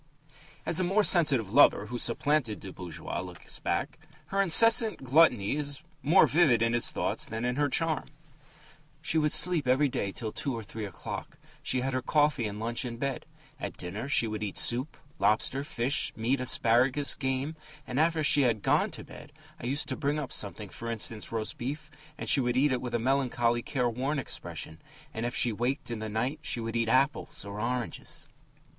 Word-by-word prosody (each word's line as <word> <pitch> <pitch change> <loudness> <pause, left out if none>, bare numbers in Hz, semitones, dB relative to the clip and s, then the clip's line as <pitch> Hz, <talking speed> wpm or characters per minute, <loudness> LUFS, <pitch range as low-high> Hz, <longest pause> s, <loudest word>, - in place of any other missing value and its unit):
As 165 - +1
the 185 - +1
more 195 +4 +2
sensitive 145 - +4
lover 145 - +5
who 120 0 -5
supplanted 120 -1 0
the 95 - -9
bourgeois 90 -4 -6
looks 90 -1 -8
back, - - -2 0.3
her 195 0 +1
incessant 220 - +5
gluttony 130 -6 +3
is 145 -2 -3 0.2
more 165 +7 +5
vivid 140 -8 +3
in 115 0 +1
his 120 - +1
thoughts - - -2
than 110 +1 -5
her 145 +1 +1
charm: 160 +2 0 1.0
She 160 - +1
would 150 -1 +1
sleep 155 -2 +4
every 135 +3 +3
day 100 -5 -2
till 110 +2 -5
two 135 +2 -3
or 115 - -6
three 110 +1 -6
o'clock; 95 - -7 0.2
she 130 - 0
had 135 +1 -2
her 130 - -1
coffee 145 -4 +1
and 105 0 -6
lunch 115 +3 -2
in 120 -2 -5
bed. 135 +1 -4 0.3
At - - -6
dinner 105 +9 -6
she 120 - +3
would 110 -1 -4
eat 105 -2 -4
soup, 125 +5 +2 0.2
lobster, 110 +7 +1
fish, 135 -1 0
meat, 125 +4 0
asparagus, 125 +3 +3
game, 135 +3 -3 0.3
and 130 +2 -3
after 160 0 +2
she 145 0 +5
had 115 -6 +1
gone - - +2
to - - -7
bed 150 - -13 0.3
I 120 - -5
used 140 +4 0
to - - -2
bring 145 0 -1
up 145 -4 -4
something, 100 0 -3
for 115 +5 -7
instance, 115 -1 -4
roast 110 -2 -4
beef, 145 +5 -5 0.3
and - - -6
she - - +4
would 125 0 0
eat 140 +2 +3
it 130 - -1
with 125 -2 -4
a - - +3
melancholy, 120 -2 +1
careworn 130 +3 -2
expression, 80 -10 -6 0.3
and 115 +2 -3
if 120 - -5
she 120 - +2
waked 125 +5 -2
in 115 - -4
the 110 0 -5
night 125 +8 -2
she 120 - 0
would 115 0 -4
eat 115 -1 0
apples 135 0 0
or 100 +1 -7
oranges. 120 0 -4
125 Hz, 190 wpm, -29 LUFS, 115-145 Hz, 1.0 s, lover